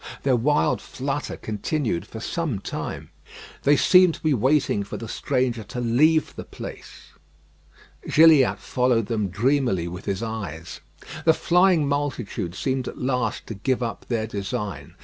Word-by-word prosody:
Their 135 -2 +3
wild 145 +5 +1
flutter 140 +2 -4
continued 110 - -2
for 110 - -8
some 155 0 -2
time. 95 - -6 0.5
They 145 +1 +4
seemed 180 +1 +5
to - - -15
be 155 -2 +3
waiting 130 -2 +2
for 100 - -7
the 115 - -7
stranger 125 -1 -1
to 125 - -6
leave 150 +7 +2
the - - -6
place. - - -10 1.0
Gilliatt 155 -4 +6
followed 125 -3 +1
them 105 -2 -1
dreamily 115 -4 +1
with 90 +3 -8
his 100 +3 -2
eyes. 95 -8 -6 0.4
The 160 -1 +5
flying 175 -3 +3
multitude 130 -11 -2
seemed 130 +1 -2
at - - -7
last 125 0 -1
to - - -6
give 125 +5 -1
up 115 - -5
their 115 -3 -1
design. 100 - -5
125 Hz, 150 wpm, -24 LUFS, 110-145 Hz, 1.0 s, Gilliatt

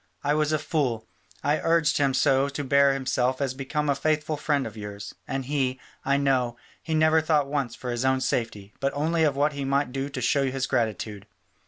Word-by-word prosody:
I 145 +1 +2
was 155 0 +1
a 155 - +2
fool: 140 -7 -1 0.4
I 150 +2 +2
urged 165 -2 +2
him 135 -2 +2
so 135 +1 +3
to 145 +1 -4
bear 140 +1 +4
himself 130 -1 0
as 135 -3 -1
became 140 +3 -2
a 140 - +3
faithful 155 +2 0
friend 145 -2 0
of 110 - -7
yours, 105 -1 -7
and 135 -1 -3
he, 130 -2 -1 0.2
I 140 +1 +2
know, 130 -4 +1 0.2
he 160 - -2
never 155 +1 +4
thought 155 -2 +2
once 140 -4 -2
of - - -21
his 120 -1 -2
own 130 0 +2
safety, 115 -6 -2
but 135 0 0
only 160 +3 +1
of 145 -3 +2
what 145 +2 +1
he 140 -1 -4
might 140 -1 0
do 135 +1 -3
to 140 - -5
show 140 -2 +2
his 135 0 -2
gratitude. 110 -5 -2
140 Hz, 210 wpm, -26 LUFS, 130-150 Hz, 0.4 s, bear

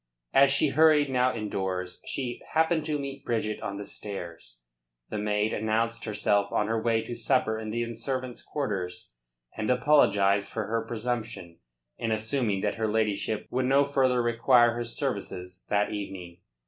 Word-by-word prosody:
As 140 0 +7
she 145 +2 +3
hurried 150 -1 +4
now 125 0 +3
indoors 95 -5 -3
she 125 -3 -4
happened 160 0 +2
to 155 -1 0
meet 140 -1 -6
Bridget 110 -2 -2
on 100 - -4
the 100 - -6
stairs. 85 - -7 0.5
The 105 - -2
maid 105 +1 0
announced 115 +2 0
herself 100 -2 +1
on 105 - +1
her 110 +1 -1
way 115 -1 +1
to - - -6
supper 115 -2 +1
in 110 -1 -5
the 115 +1 -2
servants' 130 +1 -4
quarters, 95 - -4 0.4
and 110 -1 -2
apologised 100 -7 +4
for 110 -2 -2
her 115 +2 -1
presumption 115 -7 -4 0.4
in 115 - -1
assuming 110 -2 0
that 105 +2 -1
her 110 - +2
ladyship 110 0 0
would 130 0 0
no 135 +2 +5
further 130 -3 +2
require 120 0 +4
her 120 0 -3
services 90 -5 -4
that 105 0 +2
evening. 95 -4 -6
110 Hz, 160 wpm, -28 LUFS, 100-125 Hz, 0.5 s, As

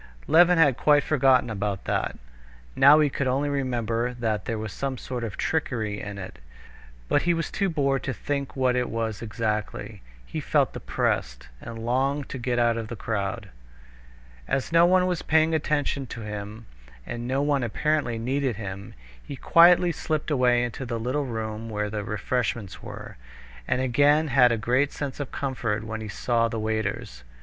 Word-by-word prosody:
Levin 175 +2 +5
had 145 -6 +4
quite 145 -1 +4
forgotten 135 -4 +3
about 105 -3 -3
that. - - -1 0.6
Now 145 +3 +7
he 150 - +4
could 140 -1 -2
only 135 +3 0
remember 125 -3 -1
that 110 -4 -2
there 115 - -2
was 110 -3 -5
some 135 -1 -3
sort 125 0 -5
of 110 -3 -5
trickery 110 -10 -2
in 105 -1 -6
it, 95 - -8 0.7
but - - +2
he 175 0 +2
was 165 -2 -3
too 195 -2 0
bored 140 -4 0
to 135 - -1
think 140 +2 -4
what 130 -2 +2
it 125 -1 0
was 115 -2 -3
exactly. 110 -2 -3 0.2
He - - -5
felt - - +1
depressed, - - -2
and 115 -1 -7
longed 135 +3 0
to 130 - -5
get 120 0 -1
out 120 -1 +2
of 115 -1 -4
the 120 - -6
crowd. 100 -2 -3 1.0
As 135 - -1
no 170 +1 +6
one 185 0 +4
was 180 -3 -1
paying 160 0 +3
any 160 - +2
attention 145 -3 -1
to 115 - -7
him, 105 +1 -7 0.4
and 120 0 -5
no 135 +2 0
one 145 -2 +1
apparently 125 +1 0
needed 130 +1 -1
him, 100 +2 -7 0.3
he 140 - -8
quietly 175 +5 +5
slipped 155 -1 -3
away 125 -3 +3
into 120 +2 -4
the 115 -2 -3
little 130 +5 -1
room 110 -1 -4
where 105 -1 -2
the 105 -1 -3
refreshments 105 0 -2
were, - - -9 0.5
and 125 - +1
again 145 +5 +3
had 125 -2 +5
a 115 - +1
great 125 +6 +1
sense 145 -1 -5
of 140 -2 -5
comfort 115 -6 -2
when 110 0 -5
he 110 - -6
saw 115 +2 +1
the 115 -1 -4
waiters. 110 - -3
125 Hz, 180 wpm, -25 LUFS, 110-140 Hz, 1.0 s, Now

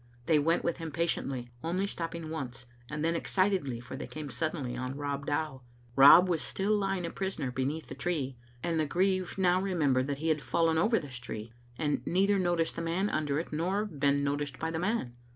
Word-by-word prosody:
They 155 +1 +4
went 165 +4 +2
with 170 - 0
him 165 -2 -5
patiently, 135 -6 -2
only 180 +4 0
stopping 165 -4 -4
once, 125 -6 -5 0.2
and 150 +1 -2
then 165 +1 +1
ex 165 - -3
citedly, 185 -11 +1
for 130 - -7
they 135 - -6
come 150 -3 -7
suddenly 150 -6 -2
on 130 +2 -4
Rob 140 -1 -3
Dow. 145 -2 -1 0.3
Rob 150 +7 +9
was 170 -4 +1
Mtill 205 +2 0
lying 195 -3 0
a 165 - -4
prisoner 190 -9 -3
beneath 135 +5 -2
the - - -8
tree, 145 -7 -2 0.3
and 170 -2 0
the 155 - +1
grieve 185 +2 +1
^ow 185 -1 +3
remembered 145 -9 +1
that 140 -1 -2
he 160 +3 -1
had 155 -1 +2
fallen 165 0 +2
over 225 +6 +3
this 135 - -5
tree, 115 -2 -7 0.2
and 150 -2 0
beither 195 +3 +2
noticed 175 -2 +1
the 170 - -3
man 175 +5 0
under 145 -2 0
it 160 0 -4
nor 185 +7 0
been 140 -6 +1
notic^ 140 -1 -2
by 160 +1 -2
the 160 - -2
man. 185 - -1
160 Hz, 205 wpm, -30 LUFS, 140-175 Hz, 0.3 s, Rob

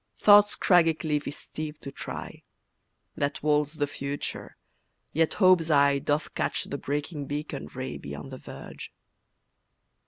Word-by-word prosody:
Thought's 205 0 +7
craggy 170 -3 +4
cliff 150 -2 -2
is 140 - -4
steep 155 -1 -7
to 140 - -7
try, - - -7 0.7
That 145 0 -2
walls 150 0 +2
the 145 -2 +1
future, 145 0 -5 0.6
yet 160 0 +2
Hope's 185 -4 +5
eye 140 -2 +4
Doth 145 +2 -1
catch - - -1
the - - -5
breaking 145 +1 -3
beacon 145 -1 -4
ray 130 0 -6
Beyond 70 +1 -8
the - - -8
verge. - - -9
150 Hz, 135 wpm, -27 LUFS, 140-160 Hz, 0.7 s, Thought's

